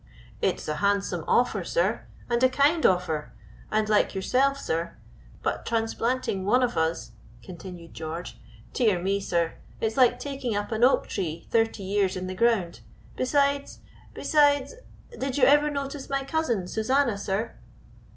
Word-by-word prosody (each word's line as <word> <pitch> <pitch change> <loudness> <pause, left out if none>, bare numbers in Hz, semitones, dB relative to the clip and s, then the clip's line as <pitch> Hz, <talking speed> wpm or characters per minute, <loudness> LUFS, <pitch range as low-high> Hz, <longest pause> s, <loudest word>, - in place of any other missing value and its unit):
"It - - +2
is - - -9
a 150 0 -2
handsome 200 +3 0
offer, - - +2
sir, - - 0 0.2
and 240 0 0
a 255 - +6
kind 290 +5 +2
offer 180 -5 -1 0.4
and 215 0 +1
like 210 -1 +2
yourself, 265 +8 +2
sir, 170 -8 -3 0.5
but - - -1
transplanting 225 -2 -1
one 250 +6 +3
of 245 -1 0
us," 160 -6 -1 0.3
continued 175 +1 -10
George, 160 +2 -6 0.3
"dear 215 -8 +2
me, 195 +3 0
sir, 170 -4 -1 0.2
it's 220 +2 -2
like 245 -1 +5
taking 260 -4 -4
up 205 +2 -3
an 220 +1 0
oak 255 - +4
tree 165 -3 -4
thirty 225 -3 +1
years 195 -1 0
in 185 - -4
the 185 - -4
ground 200 -4 +1 0.4
besides 280 +1 0 0.3
besides 290 - +3 0.4
did 265 0 -3
you 275 - +1
ever 295 +3 +6
notice 280 -1 -5
my 275 0 -1
cousin, 270 - -1
Susanna, 240 +3 +1
sir?" 200 +3 -2
225 Hz, 150 wpm, -26 LUFS, 185-270 Hz, 0.5 s, a